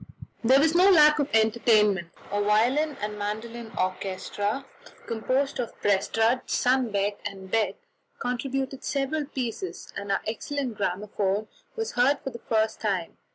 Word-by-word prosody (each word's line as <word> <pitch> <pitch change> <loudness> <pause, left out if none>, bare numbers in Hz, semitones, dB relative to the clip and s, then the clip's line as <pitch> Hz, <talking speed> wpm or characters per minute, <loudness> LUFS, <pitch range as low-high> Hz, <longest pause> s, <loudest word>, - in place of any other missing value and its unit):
There 260 +4 +6
was 315 +2 +3
no 365 +3 +6
lack 300 -5 +7
of 285 0 0
entertainment. 220 -4 +3 0.2
A 205 0 0
violin 250 +9 +2
and 210 0 -3
mandolin 220 +2 -5
orchestra, 195 +6 -2 0.4
composed 255 +5 -1
of 240 - -4
Prestrud, 225 +5 +1
Sundbeck, 215 -6 +1
and 190 -1 -7
Beck, 225 -1 +1 0.4
contributed 265 +2 -3
several 285 +2 -1
pieces, 265 - -5
and 200 0 -4
our 195 - +1
excellent 255 +2 -3
gramophone 200 +1 -1 0.3
was 450 -1 -3
heard 255 +4 +3
for 270 - -4
the 235 - -9
first 220 -1 +1
time. 190 -6 -1
225 Hz, 135 wpm, -26 LUFS, 205-270 Hz, 0.4 s, lack